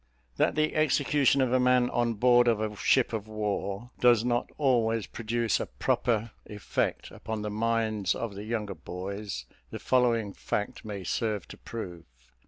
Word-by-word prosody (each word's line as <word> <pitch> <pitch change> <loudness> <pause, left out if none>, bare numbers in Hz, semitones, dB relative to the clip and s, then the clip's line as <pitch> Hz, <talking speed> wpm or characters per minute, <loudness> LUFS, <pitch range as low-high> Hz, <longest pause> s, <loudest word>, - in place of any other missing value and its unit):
That - - +2
the 155 0 +1
execution 145 -2 +3
of 130 -1 +1
a 130 - +4
man 125 -1 +4
on 120 -1 +1
board 120 +2 +5
of 115 -3 +3
a 110 -1 -2
ship 120 +4 +2
of 110 -1 -3
war 105 +1 -3
does 120 -2 +5
not 120 -1 0
always 115 -6 +2
produce 115 0 -1
a - - -3
proper 115 -1 0 0.2
effect 105 -2 -2
upon 110 0 -5
the 105 - -3
minds 110 -3 0
of 115 -3 -4
the 100 +1 -7
younger 110 -3 -2
boys, 90 - -6 0.2
the - - -6
following 115 -5 +1
fact 105 - -3
may 100 -3 -6
serve 105 +1 -2
to - - -10
prove. 90 -8 -7
110 Hz, 165 wpm, -28 LUFS, 105-120 Hz, 0.2 s, board